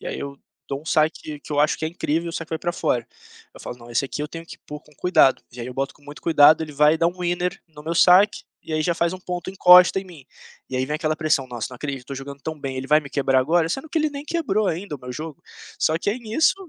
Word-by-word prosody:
E - - -9
aí - - -4
eu 140 0 -6 0.3
dou 140 0 -3
um - - -19
saque 155 -1 0
que - - -9
eu 145 - +2
acho 150 - +2
que 160 - -3
é - - 0
incrível, 165 0 -2
e - - -3
o 165 - -6
saque 165 - -5
foi 160 - -3
para 175 - -2
fora. 120 -7 -1 0.5
Eu - - -13
falo: 125 - -7
"Não, 120 0 -14
esse 120 +3 0
aqui 135 - -5
eu 150 - -2
tenho 165 +1 -8
que - - -12
pôr 150 0 -7
com 150 - -23
cuidado.". 160 -7 +4
E 120 - -9
aí 115 - -5
eu 125 - -8
boto 135 0 -2
com - - -26
muito 145 +1 -11
cuidado, 155 -1 +6
ele 150 - -10
vai 150 +2 +4
dá 170 - +3
um 175 - -2
winner 175 0 -1
no 150 -1 -14
meu 165 +1 -2
saque, 185 +5 +5 0.2
e 160 - -6
aí 155 - 0
já 170 +2 +1
faz 170 +1 0
um 185 - -7
ponto, 180 0 -5
encosta 180 0 +7
em - - -11
mim. 165 -8 -14 0.5
E - - -5
aí 130 +1 0
vem 150 - -3
aquela 155 -1 -1
pressão: 155 -4 0
"Nossa 120 -3 -5
não 125 - -9
acredito, 135 -2 -5
tô 140 - -6
jogando 140 +1 -8
tão 160 -1 -5
bem, 135 -1 -5
ele 130 - -5
vai 150 +1 +5
me 140 -3 -8
quebrar 135 -2 +2
agora?", 160 +4 +2
sendo 270 - -4
que 325 - +1
ele 310 0 +1
nem 285 0 -7
quebrou 215 - 0
ainda 170 -3 -3
o - - -21
meu 125 0 -8
jogo. 155 +1 -7 0.4
Só 160 - +2
que 200 - -3
é 215 - -2
nisso, 235 +7 +2
155 Hz, 300 wpm, -23 LUFS, 140-175 Hz, 0.5 s, encosta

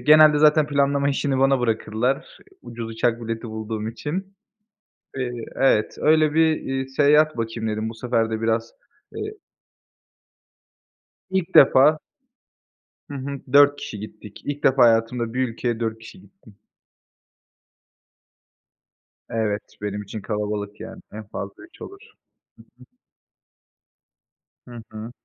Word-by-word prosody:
genelde 155 0 +6
zaten 150 0 +5
planlama 140 -1 +1
işini 140 -1 0
bana 135 0 +3
bırakırlar, 115 +2 -1 0.2
ucuz 115 -1 -7
uçak 115 +1 0
bileti 115 0 -5
bulduğum 110 0 -4
için. 180 - -5 0.8
Eee 130 -2 -2 0.3
Evet, 120 -5 +2
öyle 155 -1 +3
bir, 160 -1 +4
iii, 135 0 -3
seyahat 150 +3 +3
bakayım 115 -1 -3
dedim. 110 +1 -2
Bu 115 - -7
sefer 115 -1 -1
de 110 0 -3
biraz, 115 0 -1 0.4
eee 425 -1 -4 2.0
İlk 190 -2 -2
defa. 145 +3 +6 1.1
Hı - - -9
hı. 140 0 -5
4 145 0 +7
kişi 105 - -7
gittik. 105 0 -11
İlk 145 0 -4
defa 130 -1 +5
hayatımda 115 0 +2
bir 130 0 0
ülkeye 115 0 -3
4 110 -1 -3
kişi 115 +12 -13
gittim. 130 - -20 2.7
Evet, 110 -2 -1 0.2
benim 105 0 -3
için 105 +2 -7
kalabalık 105 -1 -4
yani. 110 - -9
En 110 +1 -8
fazla 100 -1 -7
3 335 - -18
olur. 395 - -9 0.8
Hı - - -23
hı. - - -20 1.8
Hı 120 -1 -9
hı. 110 +2 -8
120 Hz, 125 wpm, -23 LUFS, 110-145 Hz, 2.7 s, 4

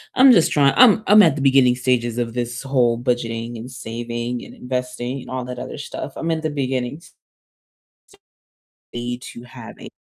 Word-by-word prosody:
I'm 260 0 +7
just 170 -8 +4
trying 140 -2 +3
I'm 225 -3 +7
I'm 210 +1 +7
at 155 -4 +3
the 140 - -4
beginning 130 -2 +4
stages 120 -1 -1
of 115 -1 -3
this 120 0 -3
whole 125 -4 +1
budgeting 115 -2 -2
and 125 +3 -9
saving 120 0 -5
and - - -13
investing 125 0 -4
and - - -12
all 130 -1 -4
that 125 -1 -7
other 140 - -7
stuff. 140 -1 -7
I'm 165 - -4
at 160 0 -2
the 155 - -1
beginning 130 +1 -3 1.7
stage 120 +1 -7
to 120 - -11
have 120 - -11
a - - -11
125 Hz, 180 wpm, -20 LUFS, 120-140 Hz, 1.7 s, I'm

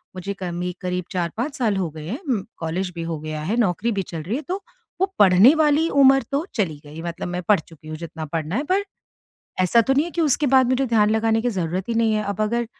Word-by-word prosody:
मुझे 190 +2 -4
कमी 175 0 -3
करीब 180 -1 -2
4-5 205 - -2
साल 225 -5 +1
हो 180 -4 -1
गए 155 0 -9
हैं 245 - -4
उम, 250 - -2
कॉलेज 180 +3 -3
भी 165 - -4
हो 155 - -3
गया 155 0 -5
है, 210 +9 -1
नौकरी 220 +1 +1
भी - - +2
चल 160 -2 -4
रही 205 +9 -2
है, 295 - -2
तो 370 +7 -4 0.4
वो - - +5
पढ़ने 200 - +7
वाली 310 +1 +3
उम्र 270 -1 +5
तो 290 +5 0
चली 160 -9 -1
गई। 155 +3 -9
मतलब 170 +1 -5
मैं 180 0 -3
पढ़ 205 - +6
चुकी 155 -1 -15
हूँ, 155 - -6
जितना 160 -1 -7
पढ़ना 160 +4 -3
है, 280 - 0
पर 380 +6 +1 0.8
ऐसा 210 +6 +4
तो 265 +4 +1
नहीं 285 +4 +3
है 345 - -6
कि 340 - -3
उसके 295 -1 +2
बाद 260 -1 +4
मुझे 260 +1 +2
ध्यान 215 -2 +3
लगाने 220 0 +2
की 245 - +1
ज़रूरत 185 0 -3
ही 230 - -1
नहीं 225 -1 +2
है। 215 - 0
अब 200 +1 -4
अगर 235 +2 0
205 Hz, 250 wpm, -22 LUFS, 170-260 Hz, 0.8 s, पढ़ने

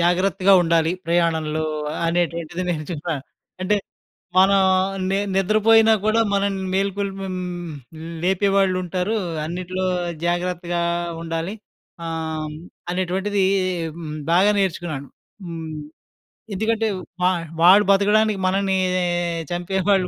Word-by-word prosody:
జాగ్రత్తగా 185 +3 +3
ఉండాలి 165 -1 +2
ప్రయాణంలో 160 -2 +1 0.4
అనేటువంటిది 170 0 -1
నేర్చుకున్నాను. 155 -2 -3 0.4
అంటే 210 +3 +2 0.6
మనం 195 +1 +6 0.5
ని 195 - +1 0.2
నిద్రపోయినా 215 +3 +5
గుడా 220 +1 +3
మనల్ని 195 -1 0
మేల్కొల్పే 195 0 -2
హ్మ్, 180 -2 -5 0.5
లేపే 190 +2 +2
వాళ్ళుంటారు. 185 +1 +1 0.3
అన్నిట్లో 185 +3 -3 0.4
జాగ్రత్తగా 175 0 -1 0.4
ఉండాలి. 165 +3 -3 0.5
ఆహ్, 160 -1 -3
హ్మ్, 150 - -7 0.4
అనేటువంటిది 190 +2 0 0.5
హ్మ్, 155 -3 -6 0.2
బాగా 190 +5 +5
నేర్చుకున్నాను. 165 -7 -2 0.4
హ్మ్. 165 -2 -6 0.8
ఎందుకంటే 220 +3 0 0.3
వా 180 - +4 0.3
వాడు 190 +4 +8
బతకడానికి 210 +1 +3
మనల్ని 195 0 +1 0.7
చంపే 175 +2 -2
వాళ్ళు 190 -2 +3
185 Hz, 95 wpm, -22 LUFS, 170-195 Hz, 0.8 s, వాడు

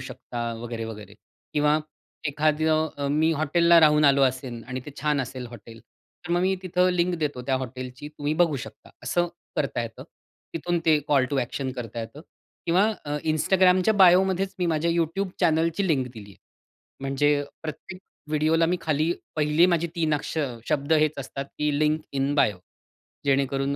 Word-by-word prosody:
शकता, 120 -1 -5
वगैरे-वगैरे. 115 -3 -7 0.4
किंवा 150 0 +3 0.5
एखादं 155 +2 +1
अ, 140 -1 -2
मी 155 +3 +2
हॉटेलला 170 +2 +4
राहून 150 -1 +5
आलो 140 -1 +5
असेन 130 -2 -1
आणि 130 +2 -5
ते - - -6
छान 150 -1 +1
असेल 130 0 -5
हॉटेल, 115 -1 -12 0.5
तर - - -6
मग 175 - +2
मी 190 +1 +2
तिथं 180 0 +2
लिंक 180 0 +1
देतो 145 -5 -2
त्या 135 - +1
हॉटेलची 130 +2 -7
तुम्ही 150 0 -3
बघू 165 -3 +2
शकता, 130 - -10
असं 175 0 +1 0.3
करता 135 -4 -1
येतं. 115 -1 -8 0.5
तिथून, 175 +2 -1
ते 155 -2 +5
कॉल 140 -3 +4
टू 140 - 0
ॲक्शन 130 +1 -2
करता 120 -2 -6
येतं 115 +6 -8 0.5
किंवा 180 +4 +4 0.2
अ, 145 0 -2 0.2
Instagramच्या 185 +5 +3
बायोमध्येच 190 0 +4
मी 180 - 0
माझ्या 165 0 +1
YouTube 170 +3 -1
चॅनलची 165 +2 +2
लिंक 135 -6 +1
दिली 105 -4 -11
आहे. 100 - -17 0.7
म्हणजे 145 +2 +1 0.2
प्रत्येक 175 +4 -8 0.3
व्हिडिओला 155 +2 +2
मी 180 +2 0
खाली 155 +1 +1 0.2
पहिली 150 +2 +4
माझी 170 -2 +1
3 160 -2 +1
अक्ष 150 +2 -3 0.3
शब्द 145 +2 +1
हेच 155 -1 +3
असतात, 135 +1 -5
की 150 -1 0
लिंक 155 +1 +2
इन 135 +1 0
बायो, 105 -9 +3 0.7
जेणेकरून 135 0 +1
150 Hz, 160 wpm, -25 LUFS, 135-170 Hz, 0.7 s, राहून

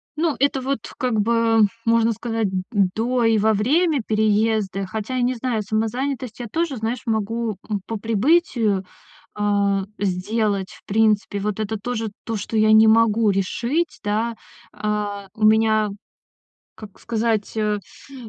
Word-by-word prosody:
Ну, 315 -1 0
это 275 0 +1
вот 270 0 -1 0.2
как 245 -4 0
бы, 230 +1 +2 0.3
можно 230 0 +3
сказать, 225 -1 -2
м, 185 -1 -2
м, 200 -3 +3
до 240 +2 0
и 225 -1 +4
во 220 +1 +3
время 290 - +2
переезда. 215 -2 +1
Хотя 220 +5 -4
я - - +1
не 250 +1 +1
знаю, 240 -2 -1
самозанятость 230 +3 -2
я 240 - -5
тоже, 320 +3 -2
знаешь, 230 +2 -3
могу, 225 -1 -1
м, 205 -3 -1
по 225 - -4
прибытию, 225 - +2 0.5
а, 200 -1 +1
сделать, 200 +1 -1
в - - -16
принципе. 210 -1 +1
Вот 210 +1 -2
это 215 0 -2
тоже 225 +1 -3 0.2
то, 225 - -3
что 220 +2 -4
я 215 0 +5
не 220 0 +7
могу 225 -1 +4
решить, 240 - -1
да, 220 +3 0 0.4
а. 210 -1 -3
У 215 - -2
меня, 215 0 +4 0.9
как 210 -3 -12
сказать, 225 -2 -1
э, 210 -1 0 0.3
э, - - -12
220 Hz, 155 wpm, -22 LUFS, 210-235 Hz, 0.9 s, не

